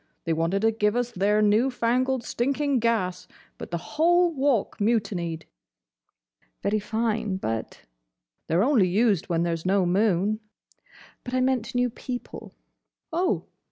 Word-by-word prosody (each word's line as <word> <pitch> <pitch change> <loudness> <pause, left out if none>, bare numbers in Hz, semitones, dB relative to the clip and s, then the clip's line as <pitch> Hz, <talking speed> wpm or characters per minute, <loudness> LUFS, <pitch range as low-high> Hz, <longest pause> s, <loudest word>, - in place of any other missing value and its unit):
They 165 - 0
wanted 165 +5 0
to 225 - +4
give 210 -1 0
us 245 0 -1
their 210 +2 +2
new 215 +5 +3
fangled, 255 +1 0
stinking 275 +3 0
gas, 220 -6 -1 0.3
but - - -7
the 170 - -2
whole 345 - +2
Walk 270 -6 0
mutinied." 195 -7 -1 1.2
"Very 210 +2 +1
fine, 220 -2 -1
but—" 115 -11 -4 0.7
"They 160 - 0
're 180 - +4
only 240 -8 +4
used 200 -1 +1
when 170 -1 +1
there's 165 -1 -2
no 190 0 +2
moon." 200 +2 +1 0.8
"But 250 0 -4
I - - +2
meant 255 -2 0
new 245 -1 +1
people!" 245 +1 -7 0.6
"Oh! 355 +2 0
220 Hz, 140 wpm, -25 LUFS, 190-250 Hz, 1.2 s, to